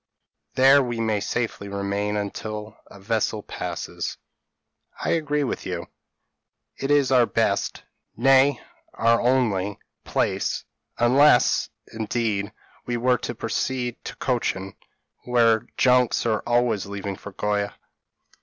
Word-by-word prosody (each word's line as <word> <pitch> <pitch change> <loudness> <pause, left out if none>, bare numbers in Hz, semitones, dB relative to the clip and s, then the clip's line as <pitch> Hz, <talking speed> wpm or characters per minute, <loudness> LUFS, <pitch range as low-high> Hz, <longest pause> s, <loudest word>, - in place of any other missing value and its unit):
There 135 +2 +7
we 120 -3 -3
may 110 -2 +1
safely 115 -1 -3
remain 100 +1 -2
until 105 +1 -5
a - - -14
vessel 105 0 -1
passes." - - -5 0.8
"I - - -1
agree 150 -3 0
with 130 - -3
you; 90 -2 -5 0.9
it 135 - -4
is 145 -3 +3
our 125 -3 +5
best, 105 -3 0 0.3
nay 135 +2 +5 0.4
our 115 0 +3
only, 110 -6 +1 0.3
place; - - -1 0.3
unless, 125 +2 +4 0.2
indeed, 110 -2 -1 0.4
we 120 0 -1
were 125 +1 +2
to 120 - -5
proceed 125 +2 -2
to - - -6
Cochin, 95 -6 -2 0.5
where 115 -3 +3
junks 125 -2 +3
are 110 -2 +1
always 120 -4 +1
leaving 100 -1 -5
for 105 - -10
Goa." 105 +1 -1
115 Hz, 115 wpm, -24 LUFS, 105-125 Hz, 0.9 s, There